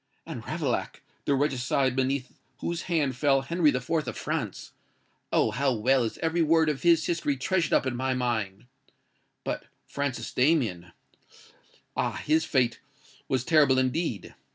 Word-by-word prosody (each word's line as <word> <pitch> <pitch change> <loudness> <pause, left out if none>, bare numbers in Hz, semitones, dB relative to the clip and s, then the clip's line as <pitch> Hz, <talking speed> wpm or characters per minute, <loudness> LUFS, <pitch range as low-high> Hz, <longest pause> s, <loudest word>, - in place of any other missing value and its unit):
And - - -6
Ravaillac—the 140 - -2
regicide 130 -1 +1
beneath 130 0 -1 0.2
whose 170 0 -3
hand 150 -7 +1
fell 135 +1 +3
Henry 170 0 +2
IV. 125 -2 -2 0.2
of - - -4
France—oh! - - -4
how 135 0 +1
well 130 +4 +3
is 110 - -3
every 165 +1 +1
word 160 0 +4
of 145 -3 -2
his 170 -2 +4
history 165 -5 0
treasured 170 +4 0
up - - +3
in 130 -2 -1
my 130 +1 -1
mind. 110 -4 -2 0.8
But - - -3 0.2
Francis 140 -2 -3
Damien—ah! 125 - -3
his 155 +2 +1
fate 125 -4 +1 0.5
was 130 -2 0
terrible 145 -5 +5
indeed! 130 - -1
135 Hz, 130 wpm, -27 LUFS, 125-155 Hz, 0.8 s, terrible